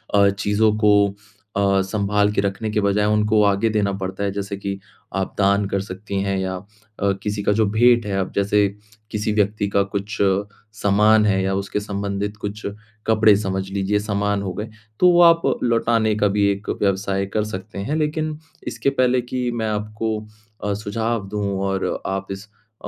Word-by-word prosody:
अ, 100 0 +6
चीज़ों 105 +2 +1
को 105 -2 +4 0.4
अ, 100 -1 +3
सँभाल 105 +1 +1
के - - +1
रखने 100 +2 -2
के 105 - +1
बजाय 100 +1 +2
उनको 105 0 +3
आगे 100 +2 +2
देना 105 -2 +1
पड़ता 95 +2 -3
है। 100 - 0
जैसे 100 0 -4
कि 100 0 -4 0.4
आप 95 -1 -2
दान 100 0 +3
कर 100 -1 0
सकती 95 0 -4
हैं 100 -1 -1
या 95 0 -2
अ, 105 +1 -4
किसी 105 -1 -2
का 105 - +2
जो 110 +1 +3
भेंट 120 0 +4
है 100 -1 -2
अब 95 - -2
जैसे 100 0 +3 0.4
किसी 105 0 -1
व्यक्ति 105 0 +1
का 100 0 +2
कुछ 100 +2 -4 0.6
सामान 105 +1 +4
है 95 -2 +2
या 95 0 0
उसके 100 +1 -2
संबंधित 100 0 -3
कुछ 105 +1 -5 0.4
कपड़े 110 -1 +5
समझ 95 -2 -3
लीजिए 100 +1 0
समान 100 -1 -1
हो 95 -2 -3
गए, 105 +4 -5 0.3
तो 180 - +6
वो 175 0 +5
आप 165 -1 +7 0.2
लौटाने 115 -2 +2
का 105 -1 +2
भी 100 0 +2
एक 100 +1 -5
व्यवसाय 100 0 0
कर 105 -1 +1
सकते 105 0 -7
हैं। 125 +10 -2
लेकिन 155 0 -1 0.3
इसके 140 - 0
पहले 130 -2 +2
कि 125 0 -3
मैं 110 -2 -2
आपको 110 +1 -2 0.5
अ, 105 -1 0
सुझाव 105 +1 -2
दूँ 105 0 -2 0.2
और 95 0 -1
आप 95 0 -3
इस 95 +2 -6 0.4
अ, - - -3
105 Hz, 185 wpm, -21 LUFS, 100-110 Hz, 0.6 s, आप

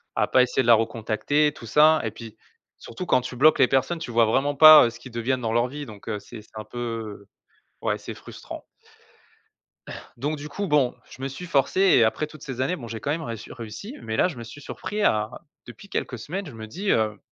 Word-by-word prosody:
À - - +1
pas 130 - +5
essayer 125 +1 0
de 120 - -3
la 120 - +8
recontacter, 115 +7 0
tout 115 - -12
ça 155 +6 +5
et 110 - -2
puis, 115 -1 -11 0.4
surtout 120 +10 -8
quand - - +3
tu 125 0 -7
bloques 155 +3 +5
les 130 - +6
personnes, 135 +6 0
tu 160 -7 -6
vois 115 0 +4
vraiment 135 +6 +1
pas, 155 0 +10
heu, 115 - +1
ce - - -13
qu'ils 125 - -12
deviennent 120 +2 -1
dans 115 -2 -2
leur 120 +1 +2
vie. 145 +3 -7
Donc 105 -2 -13
heu, 105 -2 -3
c'est 110 +2 -11
c'est 110 - -26
un - - -6
peu, 115 -4 -6 0.6
ouais, - - 0
c'est - - -8
frustrant. - - -10 1.5
Donc 145 +5 -2
du 145 +1 -8
coup, 200 +6 -4
bon, 145 -5 +2 0.2
je 130 - -13
me 135 - -2
suis 140 +7 -8
forcé 140 +3 +1
et 185 -11 +6
après 115 +7 0
toutes 155 0 -14
ces 130 -3 -7
années, 175 +8 0
bon, 120 -8 -9
j'ai 115 -1 -6
quand 140 - -2
même 160 +2 -2
réu 115 -7 -5
réussi 120 - -8
mais 110 0 -4
là, - - +4
je 160 -9 -7
me 115 - -7
suis 130 +5 -11
surpris 210 +8 -5
à 110 - +2 0.4
depuis 200 - -13
quelques 125 - -3
semaines, 185 - -5
je 145 - -9
me 110 -1 -8
dis 190 - -2
heu 110 -1 +1
125 Hz, 240 wpm, -24 LUFS, 115-150 Hz, 1.5 s, pas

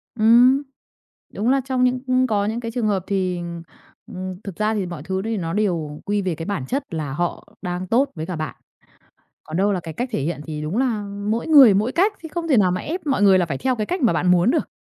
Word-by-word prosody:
Ừm, 240 +5 +5 0.7
đúng 220 +5 -1
là 270 0 +3
trong 260 -2 0
những 250 0 +2
ừm, 255 0 +3
có 205 -3 +1
những 225 +3 -2
cái 230 -1 -5
trường 230 -2 -1
hợp 195 -3 0
thì, 185 -3 -1
ừm, 170 -1 -6 0.4
ừm, 185 0 -6
thực 195 -4 -7
ra 215 +1 0
thì 200 -4 -1
mọi 170 -4 -7
thứ 190 +3 -2
thì 225 -1 -1
nó 165 -2 -3
đều 170 -8 -1
quy 205 0 0
về 180 -4 -2
cái 165 +1 -6
bản 195 -11 -3
chất 275 - -2
là 150 -4 -3
họ 175 +4 -3
đang 180 0 -4
tốt 265 +6 +2
với 160 -1 -4
cả 180 0 -4
bạn. 155 0 -4 0.9
Còn 155 - -6
đâu 200 +2 +2
là 185 - -1
cái 160 -2 -8
cách 245 +7 -3
thể 145 - -1
hiện 160 0 -3
thì 150 -1 -5
đúng 155 +7 -3
là 240 -4 0 0.3
mỗi 230 +2 -1
người 275 -10 +8
mỗi 215 +6 +1
cách 395 +5 +3
thì 325 - -8
không 330 +1 -4
thể 270 - +4
nào 190 -4 +4
mà 185 - -1
ép 330 0 -5
mọi 270 -7 +1
người 195 -2 +6
là 175 - +1
phải 135 -4 -3
theo 260 -1 0
cái 215 -2 -2
cách 360 - -2
mà 235 - +4
bạn 180 +2 +1
muốn 180 +5 +4
được. 320 - 0
205 Hz, 265 wpm, -22 LUFS, 175-250 Hz, 0.9 s, người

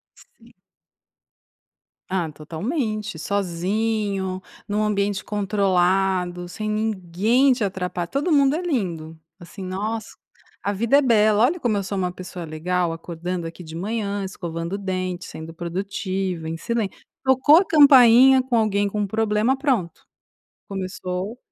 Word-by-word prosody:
Sim. 485 - -21 1.5
Ah, 180 -4 -1
totalmente, 215 - -4
sozinho, 195 +1 -1 0.3
num 210 +1 0
ambiente 205 -1 0
controlado, 190 -3 +1
sem 215 +4 -5
ninguém 215 +4 +2
te 240 - -2
atrapa 180 -2 -3
todo 285 - -1
mundo 280 -2 +4
é 325 - -1
lindo, 175 - -3 0.2
assim 190 +3 -9
nossa, 210 +4 -3 0.5
a 200 - -1
vida 230 +7 +3
é - - +3
bela, 215 -3 +4
olha 315 +8 +2
como 230 -9 0
eu - - -1
sou 200 +1 -4
uma 180 -1 -1
pessoa 180 -1 -8
legal, 170 +2 -1
acordando 170 +1 -5
aqui 170 +2 -9
de 160 0 -10
manhã, 205 +2 -2
escovando 170 -1 -4
dentes, 185 -2 -4
sendo 160 +1 -9
produtiva, 185 0 -3
em 165 +1 -3
silên 225 +1 -1 0.3
Tocou 265 +4 +5
a 370 - +5
campainha 265 -4 +7
com 255 -1 -4
alguém 205 -2 +1
com 205 0 -1
problema, 220 +4 +1
pronto, 250 - -1 0.6
começou 190 +2 -5
200 Hz, 130 wpm, -23 LUFS, 180-225 Hz, 1.5 s, campainha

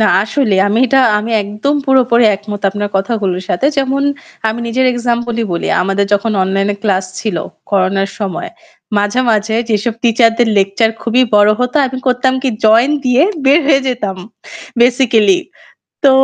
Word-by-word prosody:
না, 215 - +4 0.2
আসলেই। 215 -3 0
আমি 215 +3 0
এটা 270 +2 +3 0.2
আমি 220 +2 -5
একদম 210 +8 -2
পুরোপুরি 250 -3 +3
একমত 205 0 -8
আপনার 205 +1 -3
কথাগুলোর 195 -3 -2
সাথে। 180 - 0
যেমন, 275 0 0 0.5
আমি 220 - -3
নিজের 260 +3 +1
এক্সাম্পলই 240 -1 -2
বলি। 170 - -3 0.2
আমাদের 195 +2 0
যখন 205 +2 +1
অনলাইনে 195 +2 -1
ফ্লাস 190 -3 0 0.2
ছিল 215 -6 -3 0.3
করোনার 195 0 0
সময়, 195 -5 -4 0.5
মাঝে, 205 +5 0
মাঝে 220 0 0 0.2
যেসব 215 +2 -1
টিচারদের 230 0 +2
লেকচার 200 +3 +2
খুবই 240 +2 +2
বড় 205 0 +5
হতো, 250 +3 -1
আমি 260 0 -6
করতাম 255 +1 +1
কী, 265 - 0 0.2
জয়েন 230 +6 +4
দিয়ে 250 +2 +3 0.2
বের 280 +5 +5
হয়ে 280 -2 +4
যেতাম 210 -7 -3 0.6
বেসিক্যালি। 240 - +3 0.7
তো 275 - +7
225 Hz, 150 wpm, -14 LUFS, 205-250 Hz, 0.7 s, তো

